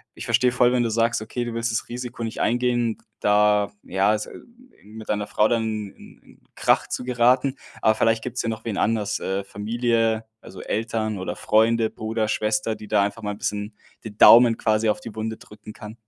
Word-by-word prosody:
ich -, -, -8 dB
verstehe 125 Hz, +2 st, +2 dB
voll, 125 Hz, 0 st, +3 dB
wenn 120 Hz, -1 st, +2 dB
du 115 Hz, -, 0 dB
sagst: 115 Hz, 0 st, +1 dB
„Okay, 120 Hz, +2 st, -4 dB
du 120 Hz, -, -5 dB
willst 115 Hz, 0 st, -2 dB
das 110 Hz, -, -2 dB
Risiko 120 Hz, -1 st, -6 dB
nicht 115 Hz, -, -4 dB
eingehen“, 120 Hz, -1 st, 0 dB, 0.2 s
da, 105 Hz, 0 st, +3 dB
ja, 95 Hz, +3 st, +1 dB
es 105 Hz, 0 st, -2 dB
hm, 235 Hz, 0 st, -14 dB, 0.3 s
mit 110 Hz, +1 st, -11 dB
deiner 105 Hz, -1 st, -1 dB
Frau 105 Hz, -, +2 dB
dann 115 Hz, -1 st, 0 dB
in 110 Hz, -3 st, -7 dB
in -, -, -21 dB
Krach -, -, +2 dB
zu -, -, -4 dB
geraten. 125 Hz, +2 st, +2 dB, 0.3 s
Aber 110 Hz, 0 st, +3 dB
vielleicht 115 Hz, 0 st, +1 dB
gibt's 125 Hz, 0 st, -3 dB
ja 115 Hz, -, -2 dB
noch 110 Hz, -, -6 dB
wen 110 Hz, -4 st, -3 dB
anders, 105 Hz, -2 st, 0 dB
äh, 95 Hz, +1 st, -3 dB
Familie, 115 Hz, +1 st, -1 dB, 0.2 s
also, 95 Hz, -, -12 dB
Eltern 110 Hz, -1 st, -2 dB
oder 95 Hz, -, -4 dB
Freunde, 110 Hz, +1 st, +2 dB
Bruder, 110 Hz, 0 st, -3 dB
Schwester, 110 Hz, +1 st, -1 dB
die 105 Hz, -, -11 dB
da 105 Hz, -2 st, +3 dB
einfach 105 Hz, +3 st, -4 dB
mal 105 Hz, -, -2 dB
'n -, -, -10 dB
bisschen 105 Hz, +1 st, -4 dB, 0.3 s
die 105 Hz, -1 st, -9 dB
Daumen 115 Hz, -1 st, +8 dB
quasi 110 Hz, 0 st, +1 dB
auf 105 Hz, -, 0 dB
die 115 Hz, -2 st, -9 dB
Wunde 110 Hz, 0 st, -4 dB
drücken 105 Hz, 0 st, -13 dB
kann. 105 Hz, +1 st, -10 dB
110 Hz, 205 wpm, -23 LUFS, 105-115 Hz, 0.3 s, Daumen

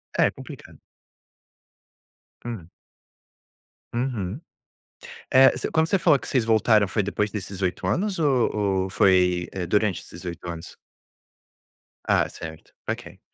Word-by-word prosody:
É, -, -, +4 dB
complicado. -, -, -12 dB, 1.6 s
Hum? 110 Hz, -9 st, -6 dB, 1.2 s
Uhum. 120 Hz, -, -2 dB, 0.9 s
É, 130 Hz, +1 st, +7 dB
se -, -, -3 dB
quando 160 Hz, -1 st, +2 dB
você 195 Hz, +2 st, +2 dB
falou 155 Hz, -5 st, +5 dB
que -, -, -10 dB
vocês 130 Hz, -4 st, +1 dB
voltaram, 110 Hz, -2 st, +4 dB
foi 105 Hz, +2 st, 0 dB
depois 105 Hz, +1 st, -1 dB
desses 100 Hz, -2 st, -6 dB
8 90 Hz, -1 st, -1 dB
anos 195 Hz, +1 st, 0 dB
ou 135 Hz, -7 st, +2 dB, 0.3 s
ou 95 Hz, -, -4 dB
foi, 90 Hz, -2 st, +3 dB
eh, 90 Hz, -3 st, -4 dB
durante 105 Hz, -3 st, +1 dB
esses -, -, -12 dB
8 85 Hz, 0 st, -6 dB
anos? 85 Hz, 0 st, -8 dB, 1.3 s
Ah, -, -, +3 dB
certo. 80 Hz, -1 st, -10 dB
Ok. -, -, -5 dB
105 Hz, 125 wpm, -24 LUFS, 90-130 Hz, 1.6 s, É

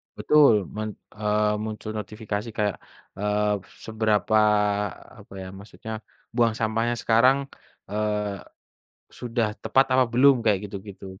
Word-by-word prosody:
Betul 135 Hz, -10 st, +4 dB
men 110 Hz, 0 st, -3 dB, 0.3 s
eee, 105 Hz, 0 st, +1 dB
muncul 110 Hz, 0 st, -5 dB
notifikasi 105 Hz, +1 st, -5 dB
kayak, 105 Hz, -2 st, 0 dB, 0.4 s
eee, 105 Hz, +1 st, +1 dB, 0.3 s
seberapa 110 Hz, -1 st, +1 dB, 0.8 s
apa -, -, -15 dB
ya 95 Hz, -, -7 dB
maksudnya, 110 Hz, +3 st, -8 dB, 0.4 s
buang 120 Hz, -2 st, +3 dB
sampahnya 115 Hz, +1 st, 0 dB
sekarang, 120 Hz, +4 st, +4 dB, 0.5 s
eee, 105 Hz, -1 st, -2 dB, 0.7 s
sudah 115 Hz, -3 st, -2 dB
tepat 135 Hz, +1 st, +3 dB
apa 130 Hz, 0 st, +5 dB
belum 130 Hz, +1 st, +5 dB
kayak 105 Hz, -2 st, +2 dB
gitu-gitu. 95 Hz, -1 st, -9 dB
110 Hz, 115 wpm, -25 LUFS, 105-115 Hz, 0.8 s, apa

